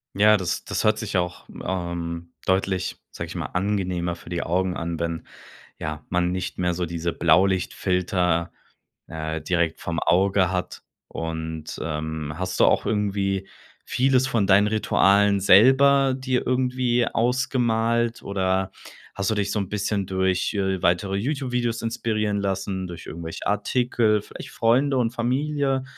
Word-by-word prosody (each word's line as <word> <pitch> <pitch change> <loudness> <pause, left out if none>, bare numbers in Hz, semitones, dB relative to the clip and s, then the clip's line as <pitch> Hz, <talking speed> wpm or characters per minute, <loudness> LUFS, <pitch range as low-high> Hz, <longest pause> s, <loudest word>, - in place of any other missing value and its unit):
Ja, 105 +1 +6
das 95 -3 -3
das - - -2
hört 110 0 +3
sich 105 -3 -2
auch 90 -1 -2 0.2
ähm, 85 -2 -4
deutlich, 95 0 0
sage - - -6
ich - - -9
mal, - - -3
angenehmer 90 -3 -1
für 85 - -14
die 85 0 -2
Augen 90 +2 0
an, 85 0 -4
wenn 85 -1 -3 0.5
ja, 75 -1 -5
man 90 0 +1
nicht 90 0 -4
mehr 90 -1 +1
so 90 0 -2
diese 85 0 -3
Blaulichtfilter, 90 0 +1 0.6
äh, 80 0 -4
direkt 85 0 0
vorm 85 -1 -3
Auge 95 0 +3
hat. 90 -1 -4 0.3
Und, 80 -1 -5
ähm, 75 -1 -4
hast 95 0 -3
du - - +7
auch - - +2
irgendwie 100 -2 -1 0.4
vieles 130 0 +2
von 115 -7 +1
deinen 100 +1 +5
Ritualen 100 -1 +3
selber 135 +7 +6
dir 130 -1 -1
irgendwie 125 -1 +1
ausgemalt 120 -2 +1
oder 95 -1 0 0.4
hast 100 0 -1
du 110 - +1
dich 100 -1 -1
so 105 - -1
'n 95 - -3
bisschen 100 -1 -1
durch, 95 +2 0
äh, 95 -2 -1
weitere 90 +3 +1
YouTube-Videos 125 -1 -1
inspirieren 110 -3 -1
lassen, 95 -1 -2
durch 85 -1 -9
irgendwelche 80 0 -7
Artikel, 110 0 +1
vielleicht - - -10
Freunde 130 +4 +2
und 115 -2 +1
Familie? 135 +2 0
95 Hz, 145 wpm, -24 LUFS, 90-115 Hz, 0.6 s, du